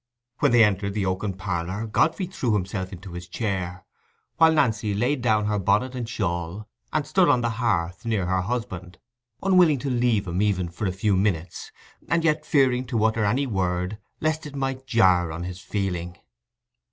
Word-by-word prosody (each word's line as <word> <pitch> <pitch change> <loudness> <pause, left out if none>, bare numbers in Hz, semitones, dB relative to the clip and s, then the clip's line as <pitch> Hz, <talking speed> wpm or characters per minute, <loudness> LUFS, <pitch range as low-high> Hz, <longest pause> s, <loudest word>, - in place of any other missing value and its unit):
When - - +3
they 120 -2 +7
entered 100 -1 +1
the 100 -3 0
oaken 95 +2 -1
parlour, 95 +2 -3
Godfrey 160 - +1
threw 135 - -2
himself 95 -1 -3
into 95 0 -9
his 85 0 -7
chair, 90 -2 -3 0.5
while 160 0 +6
Nancy 110 -8 +1
laid 125 +6 0
down 110 -3 +2
her 105 -1 0
bonnet 105 +7 +1
and 120 -3 -4
shawl, 85 -1 -3 0.2
and - - 0
stood - - +3
on 120 - +4
the 120 -1 0
hearth 90 -6 0
near 110 -6 0
her 95 +1 +1
husband, 95 -5 -4 0.5
unwilling 180 -6 +5
to 135 +2 -3
leave 120 -4 +1
him 90 +2 -2
even 95 -4 +1
for 95 +4 -3
a - - 0
few 95 +2 +1
minutes, 90 -4 -1 0.4
and 165 +2 +2
yet 155 -1 +1
fearing 130 -3 +3
to 115 -3 0
utter 110 0 +2
any 125 +8 +1
word 95 -2 -2 0.2
lest 155 -1 -1
it 145 - -10
might 135 -1 -3
jar 90 -8 +3
on 85 +2 -5
his 90 0 -6
feeling. 90 -3 -3
105 Hz, 180 wpm, -25 LUFS, 90-125 Hz, 0.5 s, they